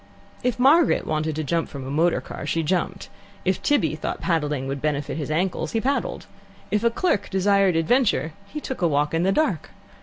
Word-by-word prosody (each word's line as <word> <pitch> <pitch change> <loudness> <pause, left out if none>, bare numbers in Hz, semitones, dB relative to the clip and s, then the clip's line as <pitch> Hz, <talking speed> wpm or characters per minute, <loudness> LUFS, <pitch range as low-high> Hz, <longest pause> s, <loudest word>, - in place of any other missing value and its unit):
If 250 -1 0
Margaret 290 +7 +4
wanted 155 0 -1
to 155 - -2
jump 165 +3 -1
from 135 -2 -7
a 135 - -5
motor 165 +4 +2
car, - - -7
she 165 - 0
jumped; 185 +3 -1 0.4
if 190 0 +1
Tibby 185 - +2
thought 155 - -4
paddling 150 -6 -1
would 135 0 -4
benefit 145 -1 -1
his 150 - -4
ankles, 165 0 -1
he 225 - +2
paddled; 275 +5 -1 0.5
if 210 +1 +1
a 235 - +5
clerk 230 - 0
desired 195 -1 +3
adventure, 165 - +2
he 300 - -6
took 265 -6 -6
a 175 - +4
walk 145 0 +1
in 165 - +1
the 190 +2 +2
dark. 200 - 0
170 Hz, 195 wpm, -24 LUFS, 155-210 Hz, 0.5 s, a